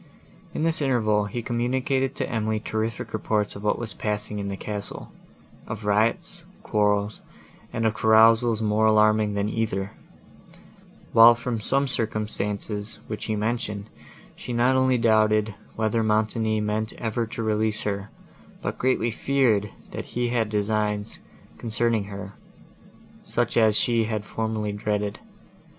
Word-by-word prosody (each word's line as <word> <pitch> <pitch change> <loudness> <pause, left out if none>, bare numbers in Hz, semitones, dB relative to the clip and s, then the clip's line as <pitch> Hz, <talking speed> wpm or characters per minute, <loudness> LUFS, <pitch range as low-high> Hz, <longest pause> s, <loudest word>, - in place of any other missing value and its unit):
In - - -1
this 165 -1 +2
interval, 110 -6 +2
he 115 +4 -4
communicated 130 +3 0
to - - -2
Emily 110 -1 -1
terrific 110 +1 -3
reports 105 -1 -1
of 100 - -8
what 105 - +1
was 115 -4 -5
passing 105 0 -3
in 100 - -3
the 100 -1 -4
castle; 105 0 -6 0.6
of 110 -1 -6
riots, 105 +3 0 0.2
quarrels, 105 0 +1 0.5
and 115 - -1
of 110 - +2
carousals 110 +1 +5
more 110 +1 +3
alarming 110 -1 +4
than 100 0 0
either; 105 -3 -2 1.2
while 115 +1 +9
from 120 -1 -3
some 135 +6 +1
circumstances, 105 -2 -2
which 110 - -5
he 110 - -1
mentioned, 105 -1 -3 0.4
she 125 - -6
not 125 +2 +3
only 130 -1 +3
doubted, 110 -2 +3 0.2
whether 110 +1 +1
Montoni 110 0 +1
meant 105 +1 -2
ever 115 0 -2
to 115 0 -5
release 110 0 0
her, 100 -1 -3 0.5
but - - -4
greatly 125 -2 +1
feared, 115 -5 +1 0.2
that - - -5
he 120 0 -2
had 115 -3 0
designs, 105 0 -1 0.4
concerning 115 -2 0
her,—such 100 0 -7
as 110 -2 +4
she 115 -2 +2
had 110 -2 -3
formerly 110 -2 -2
dreaded. 105 0 -2
110 Hz, 135 wpm, -25 LUFS, 105-115 Hz, 1.2 s, while